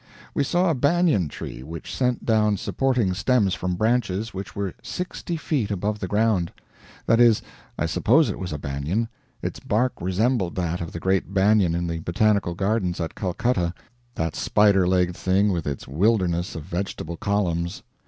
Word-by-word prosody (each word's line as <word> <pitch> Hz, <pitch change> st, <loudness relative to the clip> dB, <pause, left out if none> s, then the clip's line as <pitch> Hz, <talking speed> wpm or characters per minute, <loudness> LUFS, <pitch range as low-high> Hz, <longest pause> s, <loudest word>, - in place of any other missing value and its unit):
We 145 Hz, -, +1 dB
saw 175 Hz, +5 st, +2 dB
a -, -, +2 dB
banyan 145 Hz, -, +2 dB
tree 65 Hz, -, -7 dB
which 80 Hz, +4 st, -7 dB
sent 125 Hz, -2 st, 0 dB
down 105 Hz, -2 st, +3 dB
supporting 125 Hz, -3 st, 0 dB
stems 105 Hz, -1 st, +2 dB
from 90 Hz, 0 st, -2 dB
branches 110 Hz, 0 st, 0 dB
which 95 Hz, 0 st, -7 dB
were 100 Hz, -3 st, -2 dB
sixty 180 Hz, -1 st, -4 dB
feet 145 Hz, -9 st, -1 dB
above 105 Hz, +1 st, -2 dB
the 95 Hz, -, -3 dB
ground. 105 Hz, -4 st, +1 dB, 0.5 s
That 115 Hz, -, +3 dB
is, 120 Hz, -3 st, +5 dB, 0.3 s
I 85 Hz, -, 0 dB
suppose 125 Hz, -, +3 dB
it -, -, -4 dB
was 95 Hz, -3 st, -4 dB
a 75 Hz, -, -3 dB
banyan; 75 Hz, +11 st, -2 dB, 0.3 s
its -, -, -3 dB
bark 125 Hz, +5 st, +1 dB
resembled 95 Hz, +1 st, 0 dB
that 90 Hz, -1 st, -2 dB
of 85 Hz, -, -5 dB
the 85 Hz, -, -5 dB
great 95 Hz, +2 st, 0 dB
banyan 95 Hz, -3 st, +4 dB
in 85 Hz, 0 st, -1 dB
the 85 Hz, -1 st, -3 dB
botanical 90 Hz, +1 st, +1 dB
gardens 95 Hz, -2 st, 0 dB
at 80 Hz, -2 st, -3 dB
Calcutta, 90 Hz, -2 st, -1 dB, 0.4 s
that 80 Hz, -2 st, -2 dB
spider 100 Hz, -3 st, +3 dB
legged 90 Hz, -1 st, +2 dB
thing 95 Hz, +3 st, +2 dB
with 85 Hz, -4 st, -2 dB
its 70 Hz, -2 st, -4 dB
wilderness 90 Hz, -, +1 dB
of 80 Hz, -, -5 dB
vegetable 85 Hz, -1 st, -4 dB
columns. 90 Hz, -3 st, -1 dB
95 Hz, 170 wpm, -24 LUFS, 85-110 Hz, 0.5 s, is